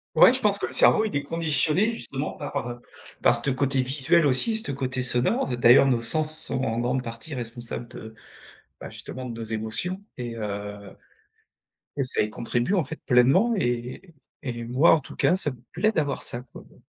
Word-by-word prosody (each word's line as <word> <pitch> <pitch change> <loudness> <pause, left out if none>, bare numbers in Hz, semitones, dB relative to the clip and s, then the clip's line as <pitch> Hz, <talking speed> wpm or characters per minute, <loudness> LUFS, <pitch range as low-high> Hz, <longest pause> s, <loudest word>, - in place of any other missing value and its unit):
Ouais, - - +8
je - - -2
pense - - +2
que - - -2
le - - -8
cerveau, 220 - +5
il 210 - -4
est 140 - 0
conditionné 165 - +2
justement 140 -9 -5
par, 145 -5 -5
heu, 120 0 -8 0.4
par - - +6
ce - - -2
te - - 0
côté 135 0 +1
visuel 140 +5 +2
aussi, 145 - +2
ce 220 - -6
te 145 - -4
côté 130 -1 -3
sonore. 125 - 0
D'ailleurs, 120 +3 +7
nos 125 -3 +2
sens 155 +6 +1
sont 130 -4 -2
en 115 +1 -1
grande 125 +2 0
partie 115 +5 -8
responsables 120 -1 -6
de, 110 -1 -10 0.7
bah, - - -8
justement 130 0 -7
de 120 - -5
nos 115 0 -6
émotions 110 - -3 0.2
et 120 -2 -5
heu 105 -2 -6 1.0
et 140 - +1
ça 125 - +1
y 105 - -1
contribue 120 - -2
en 180 - +2
fait 150 +4 -8
pleinement 135 - +4
et 125 +4 -3 0.3
et 120 -4 -4
moi 130 +7 +4
en - - 0
tout 130 - -12
cas, 180 - +3
ça 150 -6 -2
me 130 - -14
plaît 215 0 +1
d'avoir 150 -7 -1
ça 120 - -4
quoi, 125 - -14
bon. - - -22
130 Hz, 205 wpm, -25 LUFS, 120-155 Hz, 1.0 s, Ouais